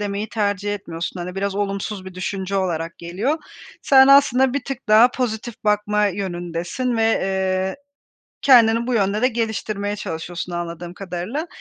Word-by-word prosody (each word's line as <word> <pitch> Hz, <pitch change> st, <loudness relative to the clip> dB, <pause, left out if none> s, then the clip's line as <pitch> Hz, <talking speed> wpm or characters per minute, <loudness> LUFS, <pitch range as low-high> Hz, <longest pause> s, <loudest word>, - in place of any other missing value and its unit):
demeyi 205 Hz, +1 st, -3 dB
tercih 205 Hz, -2 st, -1 dB
etmiyorsun, 175 Hz, -2 st, -6 dB
hani 180 Hz, +1 st, -5 dB
biraz 195 Hz, 0 st, -2 dB
olumsuz 200 Hz, 0 st, -3 dB
bir 190 Hz, -1 st, -9 dB
düşünce 190 Hz, +1 st, -3 dB
olarak 170 Hz, -3 st, -2 dB
geliyor. 200 Hz, -, -2 dB, 0.4 s
Sen 265 Hz, -1 st, +7 dB
aslında 265 Hz, -2 st, +5 dB
bir 280 Hz, -3 st, -2 dB
tık 270 Hz, -3 st, -6 dB
daha 220 Hz, +4 st, +7 dB
pozitif 240 Hz, -2 st, -3 dB
bakma 210 Hz, 0 st, +2 dB
yönündesin 175 Hz, +5 st, -3 dB
ve, 225 Hz, -, +1 dB
eee, 190 Hz, -2 st, 0 dB, 0.7 s
kendini 235 Hz, -3 st, +5 dB
bu 250 Hz, -, 0 dB
yönde 205 Hz, 0 st, +1 dB
de 255 Hz, -, +5 dB
geliştirmeye 215 Hz, -3 st, -2 dB
çalışıyorsun 175 Hz, -1 st, -5 dB
anladığım 175 Hz, 0 st, -5 dB
kadarıyla. 195 Hz, -, -4 dB
205 Hz, 145 wpm, -21 LUFS, 185-230 Hz, 0.7 s, Sen